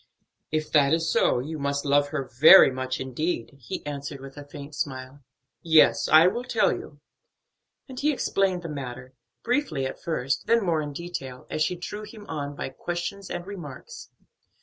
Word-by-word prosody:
"If 155 0 -2
that 145 -1 +4
is 165 0 -1
so, - - +3
you 150 +5 -4
must 140 +1 -2
love 145 0 +3
her 145 -1 -3
very 135 +6 +8
much 130 0 -3
indeed," 130 0 -3
he 115 - -6
answered 140 -1 -5
with 135 0 -11
a 145 - -8
faint 145 0 -9
smile. 130 -1 -5 0.4
"Yes, 160 -2 +4
I 155 +2 +8
will 235 +7 +1
tell 255 - +2
you." - - -9 0.9
And 260 -2 -8
he 300 +2 +2
explained 195 -9 0
the - - -4
matter; 130 -4 -7 0.3
briefly 240 - 0
at 130 - -6
first, 135 -5 -2
then 230 -3 +3
more 165 -3 +1
in 145 -1 -5
detail, 140 -5 -7
as 155 - -2
she 180 - +1
drew 190 +4 -6
him 215 0 -11
on 145 -2 -4
by - - -4
questions 175 +7 -5
and 175 0 -5
remarks. 170 -10 -9
150 Hz, 175 wpm, -26 LUFS, 135-175 Hz, 0.9 s, very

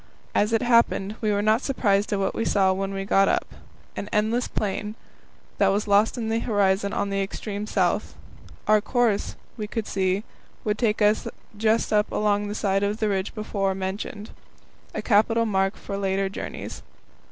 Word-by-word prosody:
As 210 +2 +2
it 225 - +2
happened, 230 -4 +3
we 215 -2 +1
were 205 0 +1
not 215 +3 +3
surprised 205 -7 +1
at 205 - +1
what 195 -1 0
we 225 - -1
saw 195 -3 +3
when 195 +1 -2
we 195 0 -4
got 195 0 +4
up - - 0 0.4
an 205 - -5
endless 220 +4 +1
plain, 210 +1 -3 0.6
that 200 - +5
was 200 +2 +1
lost 205 +4 +3
in 230 -2 -2
the 225 +1 +1
horizon 200 -3 +1
on 205 -2 -1
the 195 0 0
extreme 205 +1 -4
south. - - 0 0.5
Our 215 0 +5
course, 235 -3 0 0.2
we 210 -2 -4
could 220 0 -3
see, 190 0 0 0.4
would 210 0 -1
take 215 -3 +1
us 210 +1 +3 0.3
just 220 +2 +1
along 210 -1 +1
the 205 - -4
side 195 -2 +1
of 205 +1 0
the 215 -1 0
ridge 195 +1 -2
before 200 -3 -1
mentioned 205 +3 -5 0.6
a - - -3
capital 225 +1 +3
mark 195 -2 +1
for 200 - -5
later 195 0 0
journeys. 195 - -6
205 Hz, 175 wpm, -25 LUFS, 195-220 Hz, 0.6 s, that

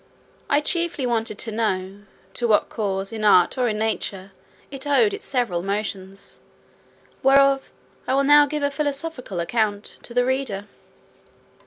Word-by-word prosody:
I 290 - +3
chiefly 340 -3 -1
wanted 225 -3 -1
to 225 - -4
know, 200 -3 -2 0.3
to 240 - 0
what 215 -2 +3
cause, 195 -1 -3
in 220 -1 -4
art 185 -4 +5
or 250 - +2
in 210 - -2
nature, 200 -3 -3 0.4
it 275 +1 -6
owed 405 +9 +3
its 405 - -7
several 235 -10 0
motions, 195 0 -5 0.8
whereof 275 0 +4 0.4
I 260 - +1
will 275 - +3
now 290 +1 +6
give 300 0 -3
a 285 - +1
philosophical 280 - -3
account 205 +3 -1
to 235 - -11
the 245 0 +3
reader. 255 -7 -2
235 Hz, 150 wpm, -23 LUFS, 200-275 Hz, 0.8 s, now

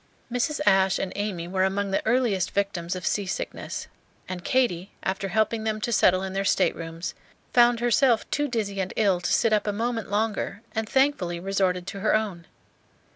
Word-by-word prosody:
Mrs. 250 +5 0
Ashe 190 0 +4
and 190 - -3
Amy 200 -5 -3
were 185 +1 0
among 195 +1 0
the 195 - +1
earliest 225 -6 +2
victims 185 -3 -1
of 180 - -6
sea 205 -2 0
sickness; 185 - -4 0.4
and 180 -1 -6
Katy, 200 -8 +1
after 190 +1 -2
helping 220 +3 0
them 215 -1 -1
to 235 - -2
settle 185 -3 +4
in 190 0 -4
their 195 0 0
staterooms, 165 -2 0 0.4
found 240 -1 +5
herself 240 -1 +3
too 290 0 +1
dizzy 210 -6 -2
and 190 - -4
ill 195 -5 +2
to 180 - -1
sit 225 -2 +3
up 210 0 +1
a - - +2
moment 225 +1 -2
longer, 210 +1 -1
and 220 -1 -2
thankfully 265 -11 +1
resorted 185 -1 0
to 200 +1 -6
her 215 +2 +2
own. 195 -6 -2
200 Hz, 180 wpm, -26 LUFS, 185-225 Hz, 0.4 s, found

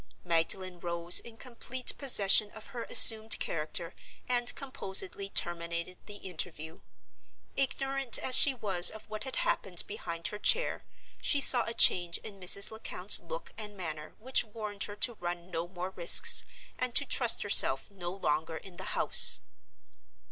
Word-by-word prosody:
Magdalen 175 +2 -3
rose 170 0 +2
in 230 -1 -14
complete 250 +1 -2
possession 210 -6 +5
of 220 - -13
her 235 -2 -8
assumed 220 0 +6
character 165 +2 -6 0.3
and 245 -1 -2
composedly 195 -7 -6
terminated 170 0 -4
the 205 - -9
interview. 165 -4 -9 0.7
Ignorant 270 -2 -2
as 255 - +1
she 275 0 +3
was 195 -7 +1
of 220 - -13
what 215 +2 -9
had 265 - -6
happened 180 -3 -1
behind 170 -5 -7
her 210 - -10
chair, - - -1 0.4
she 285 - 0
saw 250 -3 +5
a 230 - -7
change 175 -5 +3
in 200 -2 -13
Mrs. 195 +3 +3
Lecount's 220 +1 -2
look - - -11
and 210 -1 -10
manner 155 -4 -9
which 255 +4 +1
warned 210 -2 -8
her 205 - -11
to 240 +3 +1
run 175 +1 -8
no 165 0 -6
more 180 +1 -9
risks, 175 -2 +4 0.3
and 255 -1 -5
to 285 - +5
trust 245 -3 +2
herself 135 -7 +4
no 175 -3 -9
longer 160 -3 -5
in 180 0 -15
the 190 - -8
house. - - +6
195 Hz, 155 wpm, -28 LUFS, 175-235 Hz, 0.7 s, assumed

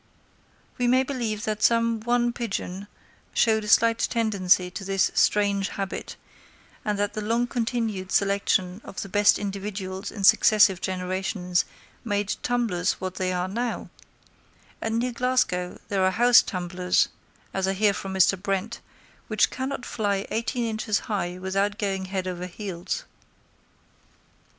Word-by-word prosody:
We 245 - +2
may 255 +2 +4
believe 235 -6 -3
that 215 -1 -2
some 230 0 +3
one 240 +1 +1
pigeon 200 -4 -4 0.5
showed 220 -2 +3
a - - -6
slight 230 +2 +4
tendency 190 -6 +2
to 195 - -6
this 195 -1 +1
strange 200 -1 +2
habit, 195 -1 -5 0.7
and 210 -1 -1
that 205 0 -1
the 215 - -3
long 230 +3 +1
continued 225 -6 -2
selection 200 -1 +1
of - - -6
the 195 - -9
best 205 +1 +4
individuals 195 -1 -4
in 200 - -7
successive 200 -1 +5
generations 185 0 -1 0.4
made 205 -3 -1
tumblers 220 -7 0
what 185 -1 -5
they 185 -1 -2
now 190 +7 -2
are; - - -13 0.9
and 225 0 -1
near 245 +2 0
Glasgow 245 -8 0
there 195 -2 +1
are 185 - +4
house 240 +5 +6
tumblers, 180 -1 0 0.4
as 190 0 0
I 195 - +1
hear 205 +1 +3
from 195 0 -5
Mr. 190 0 +3
Brent, 195 +3 -2 0.5
which 215 -1 +2
cannot 260 0 -4
fly 200 -3 -1
eighteen 235 +2 -1
inches 215 -1 -1
high 180 -4 -3
without 195 +2 -1
going 195 -2 -2
head 185 0 -3
over 180 0 -4
heels. 185 - -5
205 Hz, 140 wpm, -25 LUFS, 190-230 Hz, 0.9 s, house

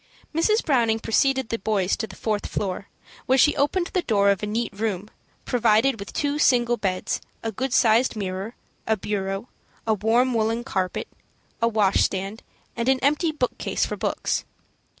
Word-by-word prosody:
Mrs. 425 +8 +2
Browning 235 -6 +3
preceded 265 +3 +1
the 230 - -2
boys 195 -2 +1
to 220 - -3
the 190 - -12
fourth 210 0 -2
floor, 195 -1 -3 0.4
where 260 - +4
she 295 +3 +5
opened 345 +6 0
the 370 - +2
door 200 -8 +3
of 200 - -1
a 210 - -2
neat 220 0 -2
room, 210 -1 -3 0.3
provided 230 +1 +3
with 200 - -7
two 290 -1 -1
single 240 -4 +4
beds, 190 -4 -2 0.2
a 225 - -2
good 260 +5 -3
sized 235 +1 +4
mirror, 195 +2 -4 0.3
a 220 0 +2
bureau, 195 +1 -3 0.4
a 220 - +2
warm 230 +5 +2
woollen 225 +1 0
carpet, 190 -7 -2 0.5
a 230 - +4
washstand, 200 -1 +1 0.3
and 235 +2 0
an 265 - +4
empty 300 +4 +2
bookcase 270 -5 -1
for - - -4
books. - - -1
225 Hz, 165 wpm, -24 LUFS, 200-255 Hz, 0.5 s, she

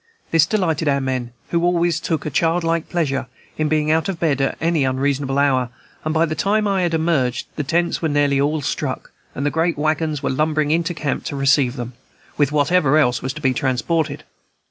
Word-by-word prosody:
This 160 -2 +4
delighted 165 -7 0
our 140 -1 +2
men, 130 -3 -3 0.2
who 170 0 0
always 175 -2 +2
took 160 -2 -2
a 155 - -3
childlike 165 +2 0
pleasure 140 -7 -1 0.3
in 155 -1 +1
being 155 0 +1
out 160 +4 +1
of 180 -4 -3
bed 145 -5 +1
at 135 - 0
any 165 -2 +1
unreasonable 135 +1 0
hour; 130 -3 +2 0.3
and 155 - -1
by 160 +1 +3
the 155 - -3
time 210 +5 +1
I 195 -2 +1
had 170 -2 +1
emerged, 155 -7 0
the 150 - -2
tents 170 +4 0
were 160 - 0
nearly 145 -1 +2
all 150 +1 0
struck, - - -3 0.2
and 140 - -3
the 145 - +1
great 165 0 0
wagons 155 -1 -1
were - - 0
lumbering 150 +2 +1
into 170 +2 0
camp 150 -3 -3
to - - -4
receive 135 -2 +2
them, 125 -1 -6 0.4
with 145 -2 +2
whatever 150 0 +3
else 125 -5 +2
was 130 - -2
to 155 - -9
be 130 -3 +2
transported. 145 +4 -1
155 Hz, 205 wpm, -20 LUFS, 140-165 Hz, 0.4 s, This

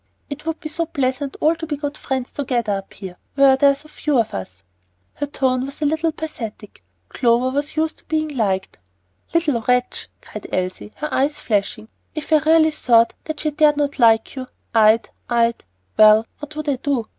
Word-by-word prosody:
It 295 +3 -7
would 325 0 -2
be - - -6
so 335 +1 -2
pleasant 270 -1 -2
all 310 +2 +4
to 325 0 -7
be 295 -2 -3
good 290 0 -4
friends 260 -2 -3
together 240 -6 -1
up 195 -1 -5
here, 185 -3 -9 0.2
where 275 -1 +6
there 280 +1 +5
are 280 - +3
so 295 +2 -10
few 300 -2 -1
of 230 -2 +1
us." 95 -1 -7 0.5
Her 290 - -4
tone 255 -2 0
was 275 +1 -7
a - - +2
little 315 +2 +1
pathetic. 225 - -8 0.2
Clover 245 - +1
was 285 +3 -3
used 315 0 -1
to - - -19
being 310 0 -1
liked. 195 - -1 0.5
"Little 305 -8 +1
wretch!" 250 +2 0
cried - - -9
Elsie, 185 0 -2
with 210 - -17 0.4
flashing 215 -4 -1
eyes. 220 - -19 0.3
"If 310 0 -3
I - - +8
really 320 -1 +5
thought 235 -6 +3
that 310 -1 -4
she 305 - 0
dared 295 0 +3
not 290 -1 +1
to 285 - -8
like 225 +1 +4
you, 260 -1 -6 0.3
I'd 220 0 +4 0.2
I'd, 235 -1 +1 0.3
well, 215 +1 +7
what 295 +1 -9
would 305 0 -5
I 280 -3 +1
do? 255 -4 -1
270 Hz, 200 wpm, -21 LUFS, 230-300 Hz, 0.5 s, I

